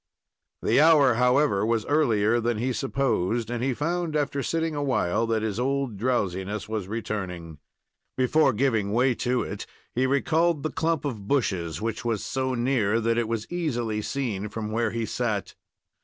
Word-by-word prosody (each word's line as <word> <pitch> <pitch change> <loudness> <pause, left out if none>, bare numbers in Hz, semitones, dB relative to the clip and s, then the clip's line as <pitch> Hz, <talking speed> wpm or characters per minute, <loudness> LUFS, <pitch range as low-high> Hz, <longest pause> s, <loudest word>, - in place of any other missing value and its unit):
The - - +4
hour, 150 -5 +6
however, 125 -2 +3
was 115 0 +1
earlier 120 -7 +2
then 120 -1 0
he 125 +3 -1
supposed, 120 -5 0
and 120 0 -2
he 130 -1 0
found, 170 +2 -1
after 145 -1 0
sitting 165 +2 -1
awhile, 115 -7 0
that 110 -1 0
his 110 0 -2
old 135 -2 -1
drowsiness 100 -3 -1
was 110 -4 -3
returning. 95 -7 -5 0.6
Before 135 +3 +3
giving 110 -4 0
way 125 +2 +3
to 125 0 +1
it, - - -6 0.3
he 130 +2 +1
recalled 155 +3 +1
the 155 - -1
clump 160 -2 -1
of 110 -8 -4
bushes, 95 - -1
which 115 +1 -2
was 115 -4 -1
so 130 -1 -1
near 120 -3 +1
that 115 +1 +1
it 115 - -1
was 115 -1 -2
easily 120 -11 -1
seen 105 -5 -3
from 110 0 -5
where 115 +1 +1
he 115 -1 -2
sat. 110 -2 -2
120 Hz, 165 wpm, -26 LUFS, 105-140 Hz, 0.6 s, hour